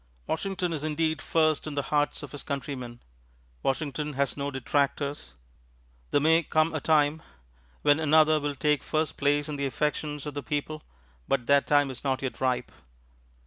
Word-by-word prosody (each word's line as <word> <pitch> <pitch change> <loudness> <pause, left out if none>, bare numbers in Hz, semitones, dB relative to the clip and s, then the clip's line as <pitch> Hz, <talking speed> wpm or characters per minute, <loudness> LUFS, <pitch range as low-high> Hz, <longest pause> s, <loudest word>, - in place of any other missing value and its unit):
Washington 185 0 -2
is 150 -2 -4
indeed 155 0 0
first 155 -2 +1
in 150 - -5
the 140 - 0
hearts 145 0 +1
of 145 - -8
his 145 - -7
countrymen. 130 -4 -5 0.6
Washington 150 +2 -2
has 140 0 0
no 140 0 -2
detractors. 140 - -1 0.7
There - - +3
may 160 +3 +4
come 155 +1 +1
a 155 - -2
time 155 0 +3 0.6
when 145 +1 +5
another 155 0 +5
will 145 -1 -2
take 150 0 +1
first 155 0 -1
place 145 0 +1
in 150 -1 -4
the 140 0 0
affections 150 +1 -2
of 150 - -5
the 145 - -4
people, 150 +2 -3 0.5
but 130 -3 0
that 140 +1 +4
time 145 -2 +3
is 130 - -10
not 135 -1 -1
yet 130 - -4
ripe. 130 -1 0
145 Hz, 170 wpm, -27 LUFS, 140-155 Hz, 0.7 s, when